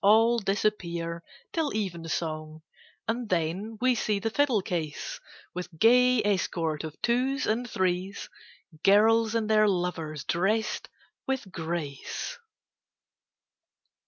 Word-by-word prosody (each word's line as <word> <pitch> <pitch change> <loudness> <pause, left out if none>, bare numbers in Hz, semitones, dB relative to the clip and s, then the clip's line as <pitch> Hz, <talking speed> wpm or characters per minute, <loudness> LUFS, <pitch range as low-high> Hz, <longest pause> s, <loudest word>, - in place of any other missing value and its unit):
All 225 +4 +6
disappear 170 -5 -1 0.3
till 320 -3 0
evensong, 160 -5 -3 0.4
And 230 0 -2
then 185 +6 -1
we 255 0 +4
see 215 -3 0
the 225 +3 -2
fiddle 255 -6 +2
case, 160 -5 -3 0.3
With 180 -2 -6
gay 250 +3 +5
escort 170 -6 0
of 155 -1 -7
twos 260 +4 +1
and 240 +3 0
threes, 185 0 -1 0.6
Girls 220 +3 +5
and 225 -2 +1
their 215 -1 +5
lovers 175 -6 -1
drest 215 +6 0 0.4
with 265 -8 -2
grace. 160 - -4
200 Hz, 105 wpm, -28 LUFS, 170-225 Hz, 0.6 s, All